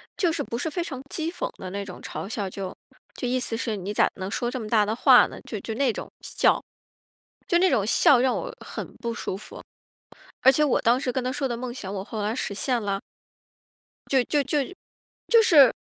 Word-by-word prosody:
就 350 Hz, -4 st, +2 dB
是 320 Hz, -3 st, -2 dB
不 235 Hz, -4 st, -4 dB
是 320 Hz, -, -2 dB
非 345 Hz, +3 st, -2 dB
常 265 Hz, -6 st, -5 dB
讥 320 Hz, 0 st, -1 dB
讽 355 Hz, -, -3 dB
的 185 Hz, -, -7 dB
那 200 Hz, 0 st, -3 dB
种 185 Hz, -2 st, -9 dB
嘲 195 Hz, -, -6 dB
笑， 205 Hz, -4 st, -3 dB
就 190 Hz, -1 st, -5 dB, 0.4 s
就 250 Hz, -, -4 dB
意 255 Hz, +1 st, +1 dB
思 230 Hz, -2 st, -2 dB
是 225 Hz, -2 st, -2 dB
你 200 Hz, +2 st, -4 dB
咋 -, -, +4 dB
能 190 Hz, 0 st, -5 dB
说 240 Hz, +1 st, -1 dB
这 255 Hz, -, -4 dB
么 215 Hz, -, -5 dB
大 215 Hz, -3 st, +4 dB
的 220 Hz, +2 st, -1 dB
话 -, -, +7 dB
呢？ -, -, -10 dB
就 215 Hz, -, -6 dB
就 220 Hz, -, -5 dB
那 260 Hz, 0 st, +2 dB
种 -, -, -7 dB
笑， -, -, +2 dB, 0.9 s
就 345 Hz, -, +3 dB
那 375 Hz, 0 st, +4 dB
种 205 Hz, -, +2 dB
笑 250 Hz, +2 st, +5 dB
让 255 Hz, 0 st, +2 dB
我 -, -, -4 dB
很 -, -, -7 dB
不 235 Hz, -1 st, -3 dB
舒 190 Hz, -, -4 dB
服。 215 Hz, -, -11 dB, 0.8 s
而 265 Hz, -, +8 dB
且 300 Hz, +3 st, +2 dB
我 270 Hz, -, +2 dB
当 240 Hz, +3 st, +4 dB
时 255 Hz, -2 st, -1 dB
跟 260 Hz, -, -1 dB
他 255 Hz, -, -1 dB
说 275 Hz, -1 st, -1 dB
的 240 Hz, -, -2 dB
梦 240 Hz, 0 st, -5 dB
想， 200 Hz, -6 st, -6 dB
我 190 Hz, -1 st, -3 dB
后 215 Hz, 0 st, -5 dB
来 215 Hz, +3 st, -1 dB
实 210 Hz, -, -3 dB
现 240 Hz, +3 st, 0 dB
了。 200 Hz, -1 st, -1 dB, 1.1 s
就 265 Hz, -2 st, +4 dB
就 290 Hz, -2 st, +1 dB
就 290 Hz, +3 st, 0 dB, 0.7 s
就 460 Hz, -1 st, +7 dB
是 290 Hz, -, +7 dB
240 Hz, 245 characters per minute, -25 LUFS, 210-275 Hz, 1.1 s, 而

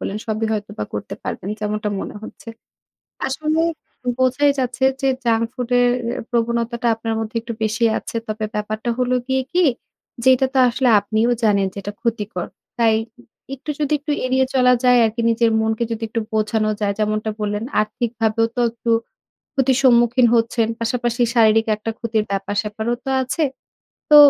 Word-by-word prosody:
বলেন 195 Hz, -, -3 dB
সবই 220 Hz, 0 st, -1 dB
হয়তোবা 205 Hz, -, -4 dB
করতে 105 Hz, -, -4 dB
পারবেন, 190 Hz, -, -5 dB
যেমনটা 210 Hz, 0 st, -2 dB
মনে -, -, -6 dB
হচ্ছে। 225 Hz, -, -11 dB, 0.8 s
আসলে 310 Hz, +4 st, 0 dB, 0.6 s
বোঝাই 260 Hz, +3 st, +3 dB
যাচ্ছে 255 Hz, 0 st, -1 dB, 0.2 s
যে 270 Hz, -, +2 dB, 0.2 s
জাঙ্ক 230 Hz, -1 st, +2 dB
ফুড 250 Hz, -2 st, -4 dB
এর 245 Hz, 0 st, +4 dB, 0.4 s
প্রবণতাটা 235 Hz, 0 st, 0 dB
আপনার 225 Hz, 0 st, -3 dB
মধ্যে 220 Hz, +1 st, -5 dB
একটু 230 Hz, +1 st, -6 dB
বেশি 225 Hz, +2 st, +1 dB
আছে। -, -, -7 dB
তবে 215 Hz, 0 st, -3 dB
ব্যাপারটা 215 Hz, +2 st, -2 dB
হলো 250 Hz, 0 st, +1 dB
গিয়ে 265 Hz, 0 st, +1 dB
কি? 360 Hz, 0 st, +3 dB, 0.6 s
যেটা 260 Hz, 0 st, +5 dB
তো -, -, +3 dB
আসলে 250 Hz, +2 st, +1 dB
আপনিও 220 Hz, +3 st, +1 dB
জানেন 200 Hz, -3 st, +3 dB
যে -, -, -25 dB
এটা 205 Hz, -, -5 dB
ক্ষতিকর। 215 Hz, -6 st, -2 dB, 0.3 s
তাই 225 Hz, -2 st, +4 dB, 0.6 s
একটু 275 Hz, +3 st, -7 dB
যদি 295 Hz, -1 st, -1 dB
একটু 295 Hz, +1 st, -3 dB
এড়িয়ে 260 Hz, +1 st, +2 dB
চলা 250 Hz, -1 st, +5 dB
যায় 250 Hz, 0 st, +6 dB
আরকি, 225 Hz, +1 st, -1 dB
নিজের 230 Hz, 0 st, +3 dB
মনকে 220 Hz, +1 st, 0 dB
যদি 225 Hz, 0 st, -5 dB
একটু 230 Hz, +1 st, -2 dB
বোঝানো 215 Hz, 0 st, +1 dB
যায়। 200 Hz, -1 st, 0 dB
যেমনটা 215 Hz, 0 st, 0 dB
বললেন, 210 Hz, +1 st, -2 dB, 0.2 s
আর্থিকভাবেও 225 Hz, 0 st, 0 dB
তো -, -, +1 dB
একটু 230 Hz, 0 st, -3 dB, 0.7 s
ক্ষতির 265 Hz, -1 st, +3 dB
সম্মুখীন 240 Hz, 0 st, +5 dB
হচ্ছেন। 230 Hz, 0 st, +2 dB
পাশাপাশি 240 Hz, +1 st, -1 dB
শারীরিক 225 Hz, -1 st, +4 dB
একটা 215 Hz, +2 st, -4 dB
ক্ষতির 225 Hz, -2 st, 0 dB
ব্যাপার-স্যাপারও 205 Hz, +3 st, -2 dB
তো 270 Hz, -, -2 dB
আছে। 275 Hz, +5 st, -1 dB, 0.7 s
তো 300 Hz, -, +7 dB
230 Hz, 160 wpm, -20 LUFS, 215-250 Hz, 0.8 s, তো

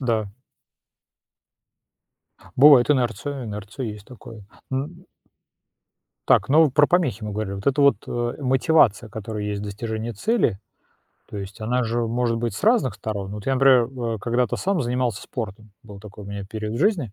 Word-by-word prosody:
Да. 115 Hz, -5 st, 0 dB, 2.3 s
Бывает 140 Hz, -1 st, +7 dB
инерция, 135 Hz, +1 st, -1 dB
инерция 105 Hz, +4 st, -6 dB
есть 105 Hz, -2 st, -8 dB
такое, 115 Hz, -4 st, -12 dB, 0.3 s
н 150 Hz, +7 st, -4 dB, 1.2 s
Так, -, -, +4 dB
ну, 160 Hz, +3 st, +6 dB
вы 150 Hz, -, +1 dB
про 145 Hz, +3 st, +4 dB
помехи 165 Hz, -, +1 dB
мы 105 Hz, -, -4 dB
говорили. 105 Hz, -1 st, -3 dB
Вот 100 Hz, 0 st, -8 dB
эта 140 Hz, +1 st, +2 dB
вот, 140 Hz, 0 st, +5 dB
э, 120 Hz, 0 st, -2 dB
мотивация, 130 Hz, -4 st, +3 dB
которая 110 Hz, -1 st, -6 dB
есть 105 Hz, -1 st, -3 dB
в -, -, -5 dB
достижении 110 Hz, +2 st, -4 dB
цели, 115 Hz, -, 0 dB, 0.7 s
то -, -, -8 dB
есть 100 Hz, +2 st, -8 dB
она 125 Hz, +3 st, 0 dB
же 115 Hz, +1 st, -1 dB
может 115 Hz, 0 st, 0 dB
быть 115 Hz, -3 st, -2 dB
с -, -, -5 dB
разных 220 Hz, -, +3 dB
сторон. 100 Hz, -3 st, -5 dB
Вот 105 Hz, -1 st, -7 dB
я, 135 Hz, -, +1 dB
например, 130 Hz, -2 st, +5 dB
в 115 Hz, -3 st, -4 dB
когда-то 120 Hz, +1 st, 0 dB
сам 190 Hz, -2 st, 0 dB
занимался 125 Hz, -4 st, -1 dB
спортом. 110 Hz, -2 st, -7 dB
Был 105 Hz, -3 st, -12 dB
такой 105 Hz, 0 st, -11 dB
у -, -, -11 dB
меня 100 Hz, 0 st, -6 dB
период 110 Hz, 0 st, -4 dB
в -, -, -3 dB
жизни. 165 Hz, -, +1 dB
115 Hz, 170 wpm, -23 LUFS, 105-130 Hz, 2.3 s, Бывает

